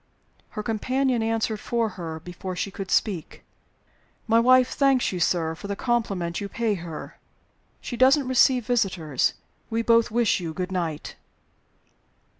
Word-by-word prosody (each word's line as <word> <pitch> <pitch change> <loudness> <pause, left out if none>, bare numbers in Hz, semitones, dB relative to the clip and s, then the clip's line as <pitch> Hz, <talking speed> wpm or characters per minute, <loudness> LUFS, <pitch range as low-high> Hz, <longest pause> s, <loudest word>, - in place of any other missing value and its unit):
Her 210 - -2
companion 255 +3 0
answered 225 -1 -1
for 230 -1 -1
her 165 -4 -6
before 180 +2 -7
she 195 - -3
could 190 0 -7
speak. 190 -8 -1 0.8
"My 225 +1 +4
wife 255 +1 +5
thanks 275 -3 +2
you, 185 - -4
sir, 165 -1 +1
for 180 +5 -9
the 200 - -3
compliment 200 -8 -1
you 200 - -4
pay 230 -1 0
her. 170 -4 -7 0.6
She 245 - -5
doesn't 265 +2 +4
receive 255 -1 +4
visitors. 185 - 0 0.3
We 230 0 -1
both 230 0 +4
wish 235 -2 +2
you 165 -3 -5
good 180 +2 -3
night." 170 -5 -3
215 Hz, 145 wpm, -25 LUFS, 180-240 Hz, 0.8 s, wife